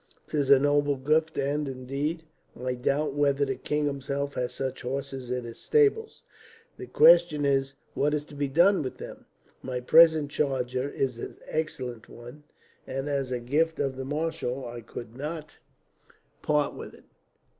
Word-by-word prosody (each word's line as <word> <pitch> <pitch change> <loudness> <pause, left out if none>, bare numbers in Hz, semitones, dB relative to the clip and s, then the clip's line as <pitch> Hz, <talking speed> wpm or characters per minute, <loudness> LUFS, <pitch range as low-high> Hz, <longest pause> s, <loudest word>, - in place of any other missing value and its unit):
"'Tis 145 -3 0
a 140 - +9
noble 145 +1 +2
gift, 155 +4 +1
and 145 +2 -1
indeed, 140 +5 -3 0.4
I 125 0 -2
doubt 140 +4 0
whether 140 -1 +2
the 135 - -1
king 150 +3 -2
himself 140 0 -3
has 125 -1 -2
such 135 -1 -4
horses 135 0 -5
in 125 0 -2
his 115 -1 -9
stables. 445 0 +1 0.5
The - - -8
question 175 - +5
is, 135 -1 +1 0.2
what 150 +2 +1
is 150 0 -3
to 150 - -13
be 145 0 -1
done 175 +8 +4
with 130 - -5
them? - - -10 0.3
My 130 -1 -4
present 155 +2 +5
charger 130 -2 -1
is 130 -4 -2
an - - -7
excellent 130 -8 -4
one 120 +5 -12 0.4
and, 135 +2 -4
as 140 -2 -1
a 125 - -1
gift 155 +7 0
of 135 -2 -1
the 130 - -5
marshal, 135 -3 -3
I 120 0 -7
could 115 +1 -9
not 150 +3 -6 0.8
part 150 -1 +1
with - - -9
it. - - -20
140 Hz, 165 wpm, -27 LUFS, 130-150 Hz, 0.8 s, a